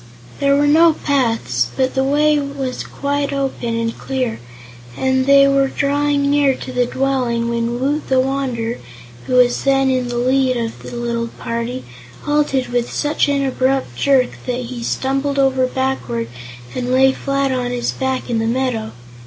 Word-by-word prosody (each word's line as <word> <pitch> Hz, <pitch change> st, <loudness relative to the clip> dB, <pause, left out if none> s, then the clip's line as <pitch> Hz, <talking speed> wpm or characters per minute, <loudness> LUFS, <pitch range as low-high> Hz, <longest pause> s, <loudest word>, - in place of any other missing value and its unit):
There 280 Hz, 0 st, +3 dB
were 290 Hz, +1 st, +3 dB
no 320 Hz, +3 st, +5 dB
paths, 230 Hz, -, 0 dB
but 260 Hz, 0 st, +1 dB
the 265 Hz, -, +1 dB
way 295 Hz, +2 st, +3 dB
was 280 Hz, -2 st, -4 dB
quite 285 Hz, 0 st, -2 dB
open 265 Hz, -4 st, -2 dB
and 230 Hz, 0 st, -2 dB
clear, 255 Hz, -4 st, -3 dB, 0.6 s
and 260 Hz, 0 st, +1 dB
they 275 Hz, 0 st, +7 dB
were 275 Hz, 0 st, +3 dB
drawing 285 Hz, +1 st, 0 dB
near 285 Hz, -2 st, +3 dB
to 255 Hz, -, -7 dB
the 250 Hz, -1 st, +1 dB
dwelling 250 Hz, -3 st, 0 dB
when 235 Hz, +1 st, -1 dB
Woot 290 Hz, +4 st, -1 dB
the 260 Hz, -1 st, +3 dB
Wanderer, 255 Hz, -3 st, -1 dB, 0.5 s
who -, -, -2 dB
was 245 Hz, -1 st, +4 dB
then 270 Hz, -1 st, +3 dB
in 255 Hz, -1 st, 0 dB
the 240 Hz, 0 st, -3 dB
lead 255 Hz, +1 st, +2 dB
of 230 Hz, -1 st, -4 dB
the -, -, -8 dB
little 235 Hz, -1 st, -2 dB
party, 235 Hz, +2 st, -4 dB, 0.4 s
halted 290 Hz, -3 st, 0 dB
with 245 Hz, -1 st, -1 dB
such 295 Hz, 0 st, 0 dB
an 280 Hz, -1 st, +1 dB
abrupt 265 Hz, -, 0 dB
jerk 260 Hz, -, +2 dB, 0.2 s
that 250 Hz, 0 st, -1 dB
he 245 Hz, 0 st, -6 dB
stumbled 275 Hz, +4 st, -1 dB
over 265 Hz, -1 st, +3 dB
backward 255 Hz, -, -2 dB, 0.4 s
and 250 Hz, 0 st, -3 dB
lay 265 Hz, +1 st, +5 dB
flat 275 Hz, 0 st, -1 dB
on 250 Hz, -1 st, -1 dB
his 245 Hz, -1 st, -1 dB
back 265 Hz, -1 st, -2 dB
in 235 Hz, -2 st, 0 dB
the 225 Hz, -, 0 dB
meadow. 235 Hz, -2 st, -1 dB
260 Hz, 170 wpm, -18 LUFS, 245-275 Hz, 0.6 s, they